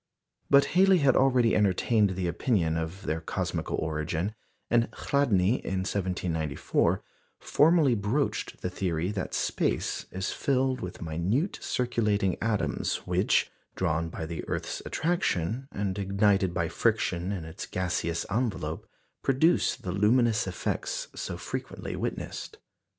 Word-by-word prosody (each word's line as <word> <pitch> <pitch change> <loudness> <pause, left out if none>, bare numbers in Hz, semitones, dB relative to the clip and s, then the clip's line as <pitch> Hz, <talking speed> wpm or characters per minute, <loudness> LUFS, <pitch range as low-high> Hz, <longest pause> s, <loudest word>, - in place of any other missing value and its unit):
But 140 0 +6
Halley 190 +1 +6
had 140 -5 +4
already 130 -3 +4
entertained 105 0 +2
the 90 -1 -1
opinion 85 -2 +1
of 80 +4 -4
their 80 +1 -2
cosmical - - -2
origin; 80 +5 -2 0.3
and 120 0 +2
Chladni 120 -6 +1
in 95 -1 -1
1794 90 -6 0 0.4
formally 155 -3 +4
broached 115 +7 -1
the 90 - -2
theory 90 -1 -1
that 100 -3 -3
space - - -1
is 95 0 -3
filled 130 -2 0
with 90 -1 -6
minute 90 - -1
circulating 105 -6 +1
atoms, 110 -2 -1
which, - - +2 0.2
drawn 85 -2 0
by 80 - -5
the 80 0 -5
earth's - - -3
attraction, 135 - 0
and 100 -1 -2
ignited 100 -1 +2
by 85 -1 -1
friction 90 +3 0
in 90 -5 -4
its 80 +2 -7
gaseous 85 -2 -1
envelope, 115 0 -2 0.3
produce 135 +6 +3
the 90 - -5
luminous 110 +3 +3
effects - - -3
so - - -5
frequently - - -5
witnessed. 435 - -4
100 Hz, 125 wpm, -28 LUFS, 85-125 Hz, 0.4 s, But